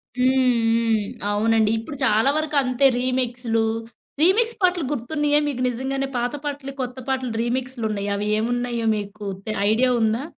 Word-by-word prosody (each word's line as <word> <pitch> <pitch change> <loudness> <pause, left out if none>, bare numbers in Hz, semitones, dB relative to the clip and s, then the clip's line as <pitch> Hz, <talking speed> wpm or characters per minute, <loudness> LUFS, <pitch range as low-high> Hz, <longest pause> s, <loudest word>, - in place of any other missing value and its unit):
హ్మ్, 255 +1 +3 0.4
హ్మ్. 230 -2 +2 0.3
అవునండి. 220 +1 +2
ఇప్పుడు 280 +6 -8
చాలా 220 +4 +3
వరకు 310 -1 -3
అంతే 255 +1 +1
రీమిక్సులు 245 -3 0 0.6
రీమిక్స్ 450 +7 +4
పాటలు 360 -4 +2
గుర్తున్నాయా 295 +3 +1
మీకు 255 -3 -3
నిజంగానే, 270 +3 -2
పాత 245 +3 -1
పాటలు, 280 -1 -5
కొత్త 250 0 -5
పాటలు 260 -2 -1
రీమిక్సులు 250 0 -2
ఉన్నాయ్యి. 205 -1 -3
అవి 205 +1 -2
ఏమున్నాయో, 240 +1 -1
మీకు 205 0 -6 0.2
తె 215 - -3 0.2
ఐడియా 250 +4 +3
ఉందా? 225 +4 +1
245 Hz, 145 wpm, -22 LUFS, 225-275 Hz, 0.6 s, రీమిక్స్